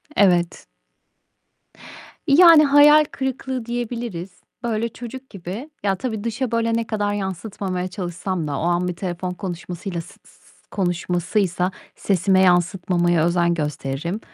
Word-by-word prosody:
Evet. 175 -4 +2 1.6
Yani, 325 +1 +8
hayal 295 +2 +7
kırıklığı 265 -2 -3
diyebiliriz. 235 -6 -4 0.3
Öyle 230 0 -1
çocuk 250 +3 -9
gibi 195 - -7
Ya, 195 -1 +1
tabii, 220 +1 -4
dışa 230 +2 -2
böyle 230 0 +1
ne 230 0 -1
kadar 205 -2 -1
yansıtmamaya 190 -1 -4
çalışsam 180 -2 -4
da 140 -2 -3
o - - -3
an 175 +1 +1
bir 180 - -3
telefon 180 0 -4
konuşmasıyla 180 0 -5
s - - -14 0.2
s - - -21
s - - -24 0.3
konuşmasıysa 180 +1 0 0.2
sesime 190 0 +2
yansıtmamaya 175 -2 +2
özen 170 0 +2
gösteririm. 150 +3 -3
190 Hz, 125 wpm, -22 LUFS, 175-230 Hz, 1.6 s, Yani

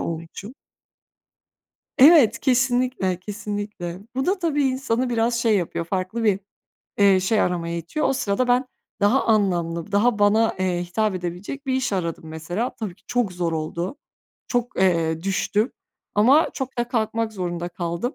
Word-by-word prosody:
olmuşum. 170 +7 -6 1.4
Evet, 265 -6 +7
kesinlikle, 245 -7 +1
kesinlikle. 205 -3 -5 0.2
Bu 265 +1 -1
da 380 +2 +1
tabii 320 -5 0
insanı 260 -2 0
biraz 235 0 +1
şey 225 -3 +3
yapıyor, 170 -2 -2
farklı 190 +6 -3
bir, 200 -3 +2 0.6
eee, 200 -2 +5
şey 210 +4 +1
aramaya 170 -1 -1
itiyor. 170 - -2
O - - +2
sırada 255 -2 0
ben 250 +2 +3 0.3
daha 205 +7 +3
anlamlı, 175 -6 0
daha 215 +2 +3
bana, 215 +2 +3
eee, 180 -2 0
hitap 210 +3 -1
edebilecek 185 +10 -5
bir 260 - 0
iş 260 -4 -1
aradım, 170 -4 -2
mesela. 175 +9 -3
Tabii 210 -6 -5
ki - - -32
çok 245 -6 0
zor 175 -2 -2
oldu, 170 - -3 0.5
çok, 245 -1 -1
eee, 165 -3 +1
düştüm 205 +4 0 0.4
ama 260 +10 +5
çok 265 -1 -5
da 240 0 0
kalkmak 225 -1 -1
zorunda 175 -3 -3
kaldım. 175 - -3
205 Hz, 150 wpm, -23 LUFS, 175-245 Hz, 1.4 s, Evet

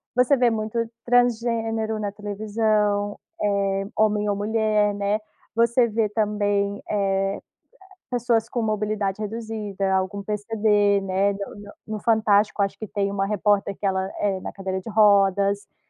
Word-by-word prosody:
você 250 +3 +4
vê 250 -2 +3
muito 220 0 -3 0.3
transgênero 230 -2 +1
na 205 -1 -2
televisão, 210 0 0 0.2
eh, 195 -1 0
homem 210 -1 +2
ou 205 - +1
mulher, 210 0 +1
né, 205 +1 0 0.4
você 235 +1 +3
vê 215 -1 0
também, 205 -1 0
eh, 195 -1 0 0.7
pessoas 235 -2 0
com 240 - -2
mobilidade 210 -2 -1
reduzida, 210 -3 -3
algum 190 +2 -1
PCD 210 -1 +1
né, 195 +1 +1 0.5
no 215 -1 -4
Fantástico 215 -1 +2
acho 195 0 0
que 215 - -6
tem 200 -1 -1
uma 195 -1 0
repórter 205 -1 +1
que - - -5
ela, 190 0 0
eh, 195 -2 0
na - - -5
cadeira 190 -1 -4
de 225 - -8
rodas, 200 -2 +3
ah, - - -47
210 Hz, 140 wpm, -24 LUFS, 200-220 Hz, 0.7 s, você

